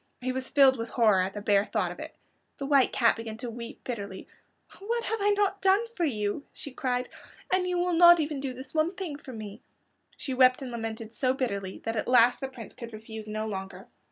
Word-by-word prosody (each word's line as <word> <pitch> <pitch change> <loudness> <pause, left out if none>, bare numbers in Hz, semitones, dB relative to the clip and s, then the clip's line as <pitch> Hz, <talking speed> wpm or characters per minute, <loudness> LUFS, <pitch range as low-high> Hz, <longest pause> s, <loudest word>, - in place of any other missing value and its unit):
He 255 +1 -2
was 260 0 -2
filled 270 -2 +5
with 230 0 -4
horror 215 -6 +4
at 190 +2 -2
the 205 - -4
bare 200 -2 +4
thought 205 -4 -1
of 175 - -10
it. - - -8 0.4
The 275 - -4
White 275 -2 +4
Cat 230 -2 +3
began 225 -1 -6
to 240 0 -5
weep 235 +3 -9
bitterly. 200 -6 -6 0.5
"What 465 +4 -2
have 445 -1 -2
I 410 - +3
not 400 -1 +1
done 390 +4 +4
for 370 -7 -1
you?" 215 -1 -2
she 285 - -8
cried; 250 -1 -2 0.5
"and 370 -1 +2
you 360 0 0
will 355 0 +1
not 345 +1 +8
do 320 - +1
even 295 -2 -4
this 260 0 -6
one 320 +4 +1
thing 355 -6 -5
for 265 - -10
me." 215 -1 -8 0.6
She 265 - -4
wept 255 +1 +4
and 255 - -6
lamented 225 -1 -5
so 255 +1 +1
bitterly 200 -7 -3
that 225 0 -2
at 215 - -2
last 245 -1 +5
the 270 - -3
Prince 255 -4 -10
could 235 -2 -9
refuse 220 0 -8
no 215 +1 -3
longer. 195 0 -6
250 Hz, 225 wpm, -28 LUFS, 220-290 Hz, 0.6 s, not